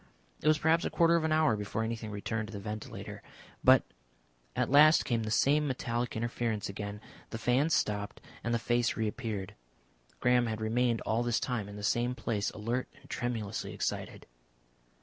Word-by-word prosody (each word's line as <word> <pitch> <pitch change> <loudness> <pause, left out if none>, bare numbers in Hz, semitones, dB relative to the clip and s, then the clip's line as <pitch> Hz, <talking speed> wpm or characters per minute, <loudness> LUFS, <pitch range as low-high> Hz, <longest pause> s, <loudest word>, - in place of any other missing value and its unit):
It - - -1
was 155 0 +5
perhaps 160 +2 +3
a - - 0
quarter 170 0 +4
of 165 - +2
an 160 - 0
hour 155 -6 +4
before 105 +2 -3
anything 110 -1 -4
returned 105 +1 -3
to - - -9
the 100 - -6
ventilator. 105 +1 -7 0.4
But - - +7 0.7
at - - 0
last 155 +3 +7
came 115 -2 0
the 110 - -3
same 145 +7 +3
metallic 120 -2 -2
interference 115 -2 -2
again; 100 +1 -6 0.3
the - - -5
fans 130 +7 +2
stopped 105 -1 -1 0.2
and 120 - -1
the 120 - +3
face 120 0 +1
reappeared. 110 -3 -3 0.7
Graham 125 -1 +3
had 110 -1 -3
remained 115 +1 +1
all 110 +2 0
this 120 -1 +1
time 115 -6 -2
in 100 - -9
the 105 - -8
same 120 +3 +1
place, 110 -3 -1
alert 120 +4 -3
and - - -15
tremulously 115 -4 -3
excited. - - -3
115 Hz, 175 wpm, -31 LUFS, 110-125 Hz, 0.7 s, But